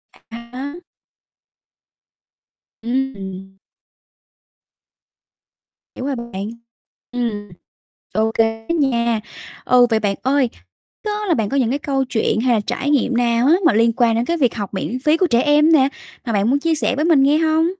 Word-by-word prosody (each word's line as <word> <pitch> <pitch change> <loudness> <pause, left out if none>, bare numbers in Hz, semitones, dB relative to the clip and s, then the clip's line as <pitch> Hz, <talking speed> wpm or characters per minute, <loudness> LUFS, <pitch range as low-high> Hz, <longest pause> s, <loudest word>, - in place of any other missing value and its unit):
À - - -22 0.3
há. 280 +5 -6 2.1
Ừm. 195 -7 -4 2.4
Hiểu 255 - -6
rồi 275 -1 -1
bạn. 220 -4 -6 0.6
Ừm. 225 -4 -3 0.7
Ô 220 +2 +1
kê 225 0 0
á - - 0
nha. 235 -7 +1 0.4
Ừ, 250 -1 +5
vậy 220 - +2
bạn 205 -2 0
ơi, 265 -1 +1 0.5
đó 420 0 -3
là 340 - +2
bạn 220 -4 -1
có 280 - -2
những 245 -3 +1
cái 280 - 0
câu 270 -2 -1
chuyện 220 -2 0
hay 245 -1 +2
là 215 - +2
trải 285 +2 -2
nghiệm 265 -3 +1
nào 235 0 +2
á 315 - +6
mà - - +5
liên 230 +2 +3
quan 235 -1 +2
đến 230 +1 0
cái 340 +6 -1
việc 255 -8 +1
học 205 -2 -5
miễn 230 +6 -3
phí 305 +1 +4
của 365 +2 +2
trẻ 240 -5 +2
em 300 +2 +4
nè, 270 -4 +5 0.4
mà 230 - -1
bạn 205 +2 +1
muốn 280 - +3
chia 325 +2 0
sẻ 290 - 0
với 300 - 0
mình 320 -5 +4
nghe 285 +3 +4
hông? 320 0 +2
250 Hz, 170 wpm, -19 LUFS, 225-285 Hz, 2.4 s, á